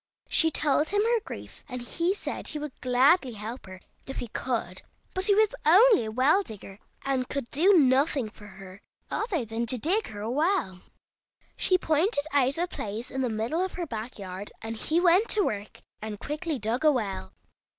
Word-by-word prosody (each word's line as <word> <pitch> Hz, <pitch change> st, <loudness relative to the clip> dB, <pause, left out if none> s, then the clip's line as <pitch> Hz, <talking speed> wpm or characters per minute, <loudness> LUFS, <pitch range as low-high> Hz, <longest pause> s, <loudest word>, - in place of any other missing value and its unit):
She 325 Hz, -, +4 dB
told 300 Hz, 0 st, +2 dB
him 410 Hz, +1 st, +2 dB
her 465 Hz, +1 st, +2 dB
grief, -, -, -10 dB
and 250 Hz, -1 st, -5 dB
he 345 Hz, +9 st, 0 dB
said -, -, -5 dB
he 305 Hz, -, -1 dB
would 300 Hz, -1 st, -5 dB
gladly 255 Hz, +2 st, +3 dB
help 220 Hz, +2 st, -7 dB
her 185 Hz, 0 st, -11 dB, 0.3 s
if 270 Hz, -, -6 dB
he 240 Hz, -, -4 dB
could, 220 Hz, -7 st, -3 dB, 0.3 s
but 375 Hz, 0 st, 0 dB
he 405 Hz, -1 st, +5 dB
was 435 Hz, +2 st, +3 dB
only 395 Hz, -, +6 dB
a 220 Hz, -, -4 dB
well 270 Hz, -, +3 dB
digger, 205 Hz, -, -10 dB, 0.3 s
and 265 Hz, -2 st, -1 dB
could 275 Hz, -5 st, -4 dB
do 360 Hz, +8 st, +4 dB
nothing 265 Hz, -4 st, +3 dB
for 210 Hz, -, -14 dB
her 190 Hz, 0 st, -12 dB, 0.3 s
other 395 Hz, -, -1 dB
than 225 Hz, +2 st, -3 dB
to 255 Hz, -, +2 dB
dig 370 Hz, -, 0 dB
her 205 Hz, -1 st, -8 dB
a 220 Hz, +2 st, -3 dB
well. 295 Hz, -, 0 dB, 0.7 s
She 370 Hz, -, +3 dB
pointed 320 Hz, 0 st, +1 dB
out 275 Hz, 0 st, +2 dB
a 350 Hz, +2 st, 0 dB
place 220 Hz, -, -6 dB
in 265 Hz, -, -2 dB
the 255 Hz, -, 0 dB
middle 230 Hz, +11 st, -1 dB
of 375 Hz, -, -4 dB
her 355 Hz, -, -4 dB
back 230 Hz, -3 st, -6 dB
yard, 195 Hz, 0 st, -7 dB
and 225 Hz, 0 st, -4 dB
he 315 Hz, +9 st, 0 dB
went 360 Hz, +5 st, +4 dB
to 420 Hz, -, +3 dB
work 205 Hz, 0 st, -4 dB, 0.2 s
and 215 Hz, -1 st, -6 dB
quickly 305 Hz, +1 st, -3 dB
dug 230 Hz, +5 st, -2 dB
a 305 Hz, -, +6 dB
well. 200 Hz, -, -3 dB
265 Hz, 195 wpm, -27 LUFS, 220-340 Hz, 0.7 s, only